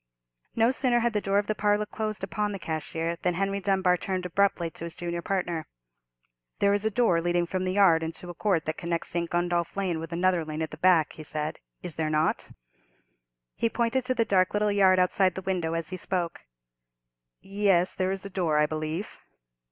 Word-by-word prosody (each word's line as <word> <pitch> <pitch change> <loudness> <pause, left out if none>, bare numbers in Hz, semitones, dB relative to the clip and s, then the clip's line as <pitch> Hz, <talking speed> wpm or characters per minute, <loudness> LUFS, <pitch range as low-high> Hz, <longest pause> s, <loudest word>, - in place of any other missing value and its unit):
No 230 +2 +4
sooner 250 -3 +2
had 235 0 +1
the 210 - 0
door 195 0 +1
of 205 - +2
the 215 - 0
parlour 210 0 +1
closed 215 -1 -4
upon 205 +2 -2
the - - -3
cashier 165 0 -3
than 180 0 -1
Henry 195 +2 0
Dunbar 190 -2 +2
turned 185 +1 -3
abruptly 180 -2 +1
to - - -9
his 170 - -7
junior 170 0 -4
partner. 175 -3 -2 0.9
"There 200 0 +3
is 205 0 0
a - - +3
door 215 -6 +2
leading 175 0 +1
from 185 +2 -2
the 185 - 0
yard 185 -5 +5
into 165 +2 -6
a 175 - -6
court 180 -3 0
that 155 +1 -3
connects 170 -1 -3
St. 170 -1 -2
Gundolph 175 0 -1
Lane 185 -5 0
with 165 +1 -7
another 175 0 +2
lane 155 0 -4
at 160 - -5
the 155 - -8
back," 175 -3 +4
he 155 - -9
said, 150 +1 -3 0.2
"is 175 -4 -6
there 160 -1 0
not?" 155 +1 0 1.1
He 230 - +1
pointed 235 +3 0
to 255 0 0
the 230 -2 +2
dark 185 -3 +2
little 210 0 +2
yard 190 -2 +5
outside 185 +1 +2
the 190 - -5
window 175 -4 -1
as 165 -1 -3
he 185 - -5
spoke. 180 -2 -2 1.0
"Yes, 195 -3 +2
there 185 0 -1
is 195 0 -3
a - - -5
door, 170 -5 0
I 150 - +4
believe." 155 +5 -4
185 Hz, 205 wpm, -27 LUFS, 165-200 Hz, 1.1 s, yard